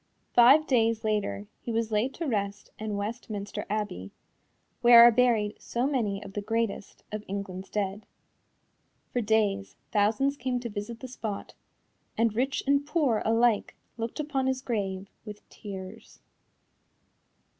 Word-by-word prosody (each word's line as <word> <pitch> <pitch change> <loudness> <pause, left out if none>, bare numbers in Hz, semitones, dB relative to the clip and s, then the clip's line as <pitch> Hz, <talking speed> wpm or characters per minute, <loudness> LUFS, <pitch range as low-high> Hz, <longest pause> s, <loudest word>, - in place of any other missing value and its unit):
Five 270 +6 +7
days 230 -5 +2
later 205 - -1 0.2
he 235 - -4
was 225 0 -1
laid 220 +5 0
to 335 - -4
rest 200 -6 -2
in 215 -1 -3
Westminster 210 -1 -5
Abbey, 205 - -3 0.7
where 240 -1 +9
are 240 - +9
buried 225 -3 +2
so 240 +2 -1
many 220 -8 -1
of 195 -1 -10
the 205 - -3
greatest 225 -1 -3
of 210 0 -4
England's 195 -1 -5
dead. 205 0 -3 1.1
For 245 - +1
days, 205 -2 +1 0.2
thousands 220 +7 +2
came 250 -1 -1
to 235 - -4
visit 210 +2 -6
the 260 - -6
spot, 220 -5 -6 0.6
and 230 -1 +2
rich 265 +4 0
and 280 +1 +3
poor 285 -8 +1
alike 225 -1 +2 0.2
looked 230 +4 -5
upon 285 -3 -1
his 260 0 -1
grave 195 -5 -2 0.2
with 210 -1 -10
tears. 190 -3 -9
220 Hz, 140 wpm, -28 LUFS, 205-245 Hz, 1.1 s, where